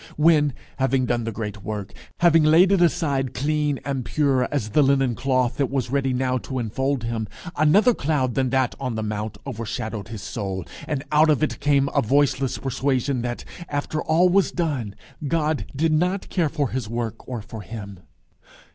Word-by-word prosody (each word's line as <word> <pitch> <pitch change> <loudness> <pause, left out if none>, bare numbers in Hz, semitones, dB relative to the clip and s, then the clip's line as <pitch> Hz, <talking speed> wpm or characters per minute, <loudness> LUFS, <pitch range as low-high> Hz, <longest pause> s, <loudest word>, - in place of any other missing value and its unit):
when, 150 -2 +4 0.3
having 135 -1 +2
done 120 -2 -1
the 115 - -2
great 105 -1 -5
work, 105 -1 -5 0.3
having 165 -2 +6
laid 165 +5 +6
it 195 -3 +4
aside 145 -7 +1
clean 150 0 0
and 135 -2 -2
pure 135 -2 +1
as 125 -7 -1
the 150 - +4
linen 135 -2 +3
cloth 130 0 0
that 140 -3 +1
was 130 -3 -2
ready 135 -1 +1
now 130 0 0
to 130 +2 -5
infold 130 +3 -1
him, 115 -2 -2 0.3
another 195 - +5
cloud 135 - 0
than 130 0 +1
that 130 -1 +1
on 125 -4 -3
the 110 - -2
mount 105 0 -4
overshadowed 110 -4 -4
his 110 -3 -7
soul, 95 -6 -4 0.2
and 145 -4 -2
out 155 +1 +5
of 155 0 +3
it - - -1
came 140 -1 +3
a 140 - +3
voiceless 135 +1 +1
persuasion 135 -1 -1
that, 120 0 -4 0.2
after 145 +1 -2
all 165 +3 +3
was 190 +2 +3
done, 135 - -2 0.3
God 155 -1 0
did 160 +3 +2
not 180 +5 0
care 170 -5 +1
for 145 -4 -1
his 125 -4 -3
work 115 -1 -4
or 120 -4 -4
for 115 -1 -8
him? 100 -1 -8
135 Hz, 180 wpm, -23 LUFS, 115-150 Hz, 0.3 s, having